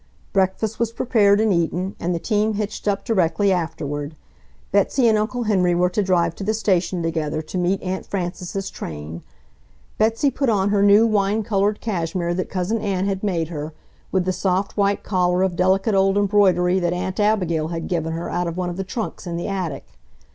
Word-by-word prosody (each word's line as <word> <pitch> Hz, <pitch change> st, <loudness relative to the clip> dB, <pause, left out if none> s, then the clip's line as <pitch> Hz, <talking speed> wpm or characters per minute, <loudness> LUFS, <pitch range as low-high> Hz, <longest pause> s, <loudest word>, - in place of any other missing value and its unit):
Breakfast 195 Hz, +3 st, 0 dB
was 235 Hz, -1 st, 0 dB
prepared 210 Hz, -4 st, +3 dB
and 220 Hz, -2 st, +3 dB
eaten, 175 Hz, +3 st, -1 dB
and 175 Hz, +1 st, -1 dB
the -, -, 0 dB
team 210 Hz, +4 st, 0 dB
hitched 210 Hz, 0 st, -4 dB
up 200 Hz, -1 st, 0 dB
directly 195 Hz, -2 st, +2 dB
afterward. 150 Hz, -4 st, -3 dB, 0.6 s
Betsy 205 Hz, +6 st, +3 dB
and 220 Hz, -, +4 dB
Uncle 235 Hz, +4 st, -1 dB
Henry 185 Hz, -5 st, +2 dB
were 180 Hz, +1 st, +2 dB
to 210 Hz, -, +1 dB
drive 175 Hz, -4 st, +1 dB
to -, -, -5 dB
the 215 Hz, +3 st, 0 dB
station 190 Hz, -4 st, 0 dB
together 160 Hz, -1 st, -2 dB
to 155 Hz, -, -6 dB
meet 180 Hz, +2 st, 0 dB
Aunt 190 Hz, 0 st, -4 dB
Frances's 185 Hz, +1 st, -4 dB
train. 80 Hz, +2 st, -7 dB, 0.8 s
Betsy 225 Hz, +6 st, +2 dB
put 270 Hz, 0 st, 0 dB
on 200 Hz, -2 st, +2 dB
her 205 Hz, -1 st, +2 dB
new 205 Hz, +2 st, +6 dB
wine 210 Hz, 0 st, +1 dB
colored 205 Hz, -1 st, 0 dB
cashmere 175 Hz, -4 st, -2 dB
that 185 Hz, +1 st, -3 dB
Cousin 190 Hz, +5 st, -1 dB
Ann 195 Hz, -2 st, -1 dB
had 195 Hz, -1 st, -1 dB
made 170 Hz, -6 st, -1 dB
her, 155 Hz, -1 st, -5 dB, 0.4 s
with 185 Hz, -2 st, +1 dB
the 185 Hz, -, 0 dB
soft 185 Hz, +1 st, -1 dB
white 200 Hz, -1 st, +1 dB
collar 180 Hz, -1 st, +1 dB
of 190 Hz, -2 st, 0 dB
delicate 190 Hz, +4 st, +2 dB
old 195 Hz, 0 st, +3 dB
embroidery 190 Hz, -3 st, +3 dB
that 175 Hz, -1 st, 0 dB
Aunt 185 Hz, +2 st, -3 dB
Abigail 180 Hz, -7 st, +1 dB
had 165 Hz, 0 st, -4 dB
given 165 Hz, -2 st, -1 dB
her 165 Hz, +1 st, -4 dB
out 175 Hz, 0 st, -1 dB
of 170 Hz, +1 st, -4 dB
one 180 Hz, -1 st, -2 dB
of 175 Hz, -, -7 dB
the 195 Hz, -, -2 dB
trunks 210 Hz, -1 st, -5 dB
in 170 Hz, -1 st, -3 dB
the 170 Hz, -, -3 dB
attic. 185 Hz, -8 st, -3 dB
190 Hz, 195 wpm, -22 LUFS, 175-205 Hz, 0.8 s, new